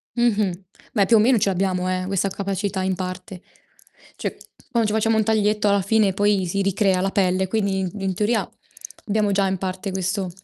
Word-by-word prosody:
Mh-mh. 210 -6 +1 0.3
Beh, 205 -5 +3
più 225 - +5
o - - +5
meno 235 +3 +4
ce 200 - +2
l'abbiamo, 185 -1 0
eh, 185 0 -2
questa 195 0 0
capacità 195 0 -3
in 190 0 0
parte. 185 0 -6 0.8
Cioè, - - -4 0.3
quando 230 -3 +1
ci 210 - -1
facciamo 220 0 +2
un 220 - +2
taglietto 210 -1 +2
alla 200 0 +3
fine 205 0 +2
poi 200 -1 +1
si 200 +3 -1
ricrea 195 -1 +1
la 195 +1 0
pelle, 190 -1 +1
quindi 200 -2 0
i 185 - -2
in 190 -1 -1
teoria 215 +4 0 0.6
abbiamo 210 -1 +1
già 195 0 +2
in 190 - -1
parte 190 +2 -4
questo 190 0 -2
195 Hz, 195 wpm, -22 LUFS, 185-210 Hz, 0.8 s, più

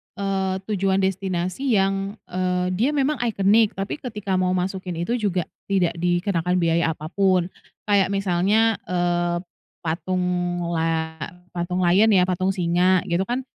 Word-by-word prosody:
eee, 195 -1 -1 0.2
tujuan 195 -1 +1
destinasi 190 +5 -1
yang, 195 +1 0 0.2
eee, 180 0 0
dia 225 +9 +1
memang 285 0 +1
iconic 215 -1 +3
tapi 195 +9 -4
ketika 210 -7 -3
mau 185 0 +1
masukin 185 -1 -3
itu 240 +7 -1
juga 190 -5 0 0.2
tidak 185 -4 +1
dikenakan 175 0 0
biaya 165 -2 +1
apa 155 +2 -8
pun. 185 -2 +2 0.3
Kayak 200 -2 +2
misalnya, 200 +4 +2
eee, 175 -1 0 0.5
patung 175 +3 -1 0.5
la 160 -1 -1 0.3
patung 180 +1 -2
lion 185 +5 +5
ya, 180 - +5
patung 185 +1 0
singa 180 +1 +2
gitu 175 +2 -1
kan, 250 +2 -2
185 Hz, 135 wpm, -23 LUFS, 175-195 Hz, 0.5 s, lion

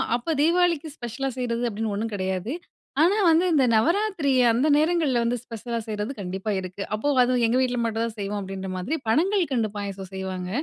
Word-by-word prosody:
அப்ப 280 +7 -2
தீபாவளிக்கு 335 -1 +2
ஸ்பெஷலா 255 +3 -3
செய்றது 240 -1 -1
அப்டின்னு 215 0 -3
ஒன்னும் 225 +2 -3
கெடையாது. 190 +3 -2 0.5
ஆனா, 365 +5 +5
வந்து 330 +2 +5
இந்த 285 -4 +4
நவராத்திரி 335 - +2 0.2
அந்த 245 +6 +2
நேரங்கள்ல 305 -6 +2
வந்து 240 +1 0
ஸ்பெஷலா 235 0 -5
செய்றது 210 +3 -3
கண்டிப்பா 190 +2 -3
இருக்கு. 185 +1 -7
அப்போ 215 +7 -1 0.2
அதுவும் 245 -1 +1
எங்க 235 +3 +2
வீட்ல 250 -1 0
மட்டும் 225 0 -1
தான் 230 - -4
செய்வோம். 205 +1 -3
அப்டின்ற 195 0 -6
மாதிரி 205 - -2
பணங்கல்கண்டு 295 - +2
பாயாசம் 195 -2 -5
செய்வாங்க. 190 -1 -4
235 Hz, 170 wpm, -25 LUFS, 205-295 Hz, 0.5 s, ஆனா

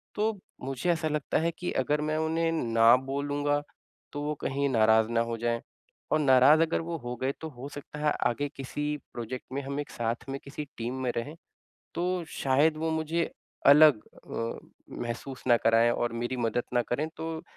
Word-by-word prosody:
तो 215 -1 0 0.3
मुझे 135 +6 -2
ऐसा 160 -1 0
लगता 150 -2 -1
है 165 +1 +1
कि 180 - -2
अगर 150 +3 0
मैं 155 0 -1
उन्हें 165 +1 +1
ना 115 -5 +5
बोलूँगा, 145 +2 -1 0.5
तो 145 - -4
वो 150 +1 -1
कहीं 140 +1 0
नाराज़ 110 -1 +4
ना 115 0 +2
हो 115 0 -3
जाएँ। 115 0 -1 0.5
और 155 - +3
नाराज़ 140 +3 +6
अगर 165 0 +1
वो 165 0 -4
हो 120 -2 -5
गए, 130 +3 -1
तो 160 - -5
हो 130 0 -9
सकता 145 +1 -9
है 150 0 +2 0.2
आगे 145 +4 -1
किसी 140 +2 -4 0.3
प्रोजेक्ट 120 +2 -5
में 140 - -1
हम 140 +1 -4
एक 145 - -4
साथ 115 +2 -3
में 135 0 -3
किसी 145 +2 -6
टीम 120 +3 -3
में 125 - +1
रहें, 145 +7 -4 0.6
तो 180 0 -1
शायद 145 +4 +2
वो 160 +1 -1
मुझे 160 +1 -1 0.4
अलग 145 -5 +8 0.3
अ, 115 0 -3 0.4
महसूस 120 +3 -6
ना 120 - +7
कराएँ 115 +1 +4
और 120 0 -1
मेरी 120 +2 -2
मदद 120 0 0
ना 120 - +4
करें, 140 +7 -1
तो 160 0 -4
140 Hz, 190 wpm, -28 LUFS, 120-155 Hz, 0.6 s, अलग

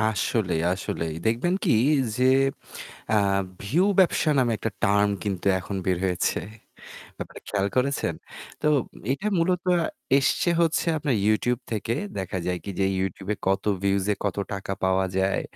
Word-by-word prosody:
আসলেই, 105 -4 0
আসলেই 85 -3 -3
দেখবেন 120 +11 +1
কি - - +3 0.4
যে 125 - +2 0.9
আ - - +4 0.5
ভিউ 150 - +2 0.2
ব্যবসা 170 -3 +3
নামে 120 -3 +3
একটা 115 - -2
টার্ম 100 +1 +3
কিন্তু 100 -2 -3
এখন 100 +2 -5
বের 90 -2 +2
হয়েছে। 90 -2 0 0.8
ব্যাপারটা - - -8
খেয়াল 100 -1 0
করেছেন? 135 +2 +1 0.5
তো 150 - -2 0.5
এটা 190 +10 -4
মূলত 180 +1 +1 0.5
এসছে 140 +5 +1
হচ্ছে 165 +1 +1
আপনার 140 -5 0
YouTube 120 +3 +2
থেকে 110 +1 -1 0.2
দেখা 95 0 -3
যায় 90 0 -1
কি - - -5
যে - - +3 0.2
YouTube 95 +1 -3 0.2
কত 95 0 +1 0.2
ভিউজ 100 -1 +1
এ - - 0
কত 100 - -1 0.2
টাকা 95 0 -4
পাওয়া 95 0 +2
যায়। 95 +1 +1
100 Hz, 145 wpm, -25 LUFS, 95-125 Hz, 0.9 s, আ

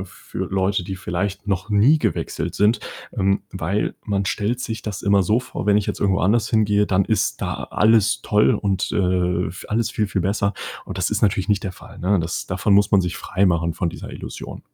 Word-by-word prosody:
f 95 - -7
für - - -11
Leute, 95 0 +1
die 95 +2 -5
vielleicht 95 +3 -3
noch 95 +1 -2
nie 115 +10 +5
gewechselt - - -2
sind, 105 +2 +3 0.4
ähm, 100 +1 +1
weil 95 +3 -1
man 100 -2 -1
stellt 105 +5 -1
sich 110 -3 -4
das 105 -3 -5
immer 100 -1 +4
so 105 +5 +2
vor, 125 -3 -6
wenn 105 -1 +5
ich 105 - +1
jetzt - - -3
irgendwo 95 -1 +2
anders 105 +5 +2
hingehe, 105 -2 +3
dann 95 0 +2
ist 110 - 0
da - - -3
alles 110 0 +3
toll 105 +1 +3
und, 100 -2 0
äh, - - -2 0.5
vi 90 - -10
alles 115 +2 0
viel, 105 -2 0
viel 95 -1 -1
besser. 100 +2 0 0.3
Und 95 - -6
das 90 +2 0
ist 110 - -1
natürlich 100 -2 +2
nicht 105 -2 +2
der 95 - -4
Fall, - - -14
ne? 95 +3 +2
Das 85 +2 -3
davon 95 +2 +1
muss 100 0 +4
man 100 - +5
sich 90 -1 -3
freimachen 85 -3 +1
von 85 +1 -2
dieser - - -7
Illusion. - - -8
100 Hz, 215 wpm, -22 LUFS, 95-105 Hz, 0.5 s, nie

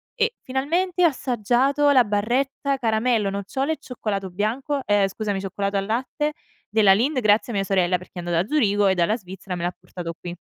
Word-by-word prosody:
E 460 -1 0
finalmente 340 +8 0
ho - - +8
assaggiato 265 +2 +1
la 260 -3 +6
barretta 250 +6 0
caramello, 225 -3 +1
nocciole 230 +10 -2
e - - -7
cioccolato 210 -8 -4
bianco, 240 +9 -1
ehm, 205 -1 +3
scusami 200 0 -3
cioccolato 200 +1 -2
al 195 - -1
latte 260 +7 -2 0.4
della 210 -2 +5
Lindt 255 +7 +1
grazie 215 +2 +3
a - - -3
mia 195 - +1
sorella, 185 -2 +2
perché 180 - -16
è - - -5
andato 175 -1 0
da - - -12
Zurigo 205 -8 +3
e 190 - +3
dalla 180 +4 +2
Svizzera 190 -2 -7
me 170 - -5
l'ha 175 +1 -2
portato 175 -2 -7
qui. 175 0 -7
215 Hz, 195 wpm, -23 LUFS, 195-265 Hz, 0.4 s, ho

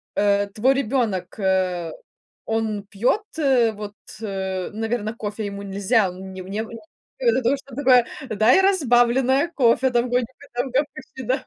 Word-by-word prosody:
э, 200 0 +2
твой 260 +5 +3
ребёнок, 220 -8 -1
э, 185 -3 0 0.5
он 220 -2 -1
пьёт, 240 - 0 0.2
э, 255 -6 +3
вот, 210 -1 -8 0.3
э, 190 -3 -3
наверно, 225 0 -3
кофе 215 -1 -4
ему 200 0 -6
нельзя, 200 +1 +1
у - - -11
неу 190 -1 -8
неу 215 +3 -4 0.5
ты - - -1
ему 265 - +3
даешь, 265 +4 +2
он 255 - -10
такой: 255 -3 +5 0.3
"Дай 220 - +5
разбавленное 265 -4 +3
кофе". 260 0 +3
Там 240 +1 +1
годика 250 +3 -2
там, 245 +2 -2
как 275 +4 +2
почти, 260 0 -10
да. 255 +2 -1
225 Hz, 155 wpm, -23 LUFS, 200-260 Hz, 0.5 s, такой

